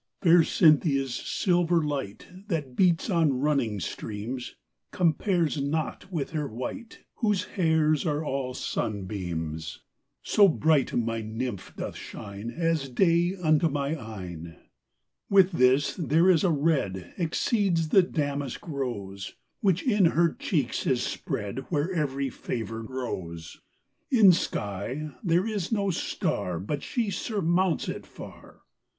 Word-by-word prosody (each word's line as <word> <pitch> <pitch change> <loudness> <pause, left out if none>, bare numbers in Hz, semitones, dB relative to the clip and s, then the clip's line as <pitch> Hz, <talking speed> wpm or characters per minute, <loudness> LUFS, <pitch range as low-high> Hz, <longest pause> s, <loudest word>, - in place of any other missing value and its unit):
Fair 170 -1 +7
Cynthia's 145 -5 +3
silver 175 +4 +1
light, 140 -9 -4 0.2
That 150 - -3
beats 175 -1 +3
on 165 - +2
running 135 -8 +1
streams, 110 +7 -5 0.3
Compares 170 -3 +1
not 155 +6 -3
with 160 -5 -3
her 150 -3 -2
white, 130 - -7 0.2
Whose 210 -4 +1
hairs 160 -4 +1
are 155 -1 -1
all 130 -2 -2
sunbeams: 85 -6 -4 0.4
So 205 -1 +5
bright 155 -5 +2
my 115 -1 0
Nymph 110 -1 -5
doth - - -5
shine 100 +2 -7
As 165 -1 -1
day 170 +6 +2
unto 155 +1 +4
my 140 -1 -1
eyne! 90 - -8 0.7
With 195 -2 +5
this, 130 -2 +3
there 165 +2 +3
is 165 -4 +3
a 185 - +3
red, 140 - 0
Exceeds 175 -1 +1
the 190 - +7
damask 145 -5 -3
rose, 105 -10 -5 0.2
Which 190 -4 +2
in 210 -7 +3
her 165 0 +3
cheeks 145 -9 -1
is 130 -3 +2
spread, 105 +3 -3
Where 165 +3 0
every 140 -5 -1
favour 115 -2 -4
grows; 95 -10 -6 0.5
In 220 -7 +7
sky 125 - -2
there 175 +1 +2
is 210 -4 -3
no 200 -3 +1
star, 105 - -2
But 140 - -3
she 230 -5 -2
surmounts 185 -4 0
it - - -5
far. - - -12
150 Hz, 125 wpm, -27 LUFS, 120-175 Hz, 0.7 s, Fair